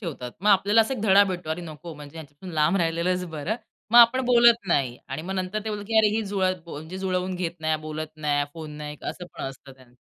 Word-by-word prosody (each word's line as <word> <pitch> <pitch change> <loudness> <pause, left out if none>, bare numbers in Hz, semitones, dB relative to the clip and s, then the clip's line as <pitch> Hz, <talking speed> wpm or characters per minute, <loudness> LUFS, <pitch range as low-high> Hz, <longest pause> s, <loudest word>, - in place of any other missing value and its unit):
ठेवतात. 140 - -6
मग 210 - +1
आपल्याला 205 +3 +5
असा 225 +4 +1
एक 255 - -6
धडा 200 -2 +6
भेटतो, 180 -4 -4
अरे, 160 +3 -2
नको, 160 +1 -9
म्हणजे 145 +1 -12
ह्यांच्यापासून 160 +3 -10
लांब 155 +5 +3
राहिलेलंच 175 +1 0
बरं. 175 +10 -2 0.3
मग 240 - +7
आपण 240 +2 +7
बोलत 235 -2 +5
नाही 130 -6 +1
आणि 135 +4 -4
मग 190 +3 -4
नंतर 185 +2 -2
ते 220 - -3
बोलत, 205 -1 -4
की 225 - 0
अरे, 215 - +5
ही 225 - 0
जुळतं 185 -4 -1
म्हणजे 160 +5 -7
जुळवून 185 -1 -1
घेत 175 -2 -4
नाही, 155 0 +1
बोलत 155 0 -5
नाही, 145 -2 0
फोन 160 -2 -8
नाही, 150 0 -7
असं 180 - -5
पण - - -7
असतं 135 0 -8
त्यांचं. 130 -2 -21
175 Hz, 230 wpm, -25 LUFS, 155-195 Hz, 0.3 s, मग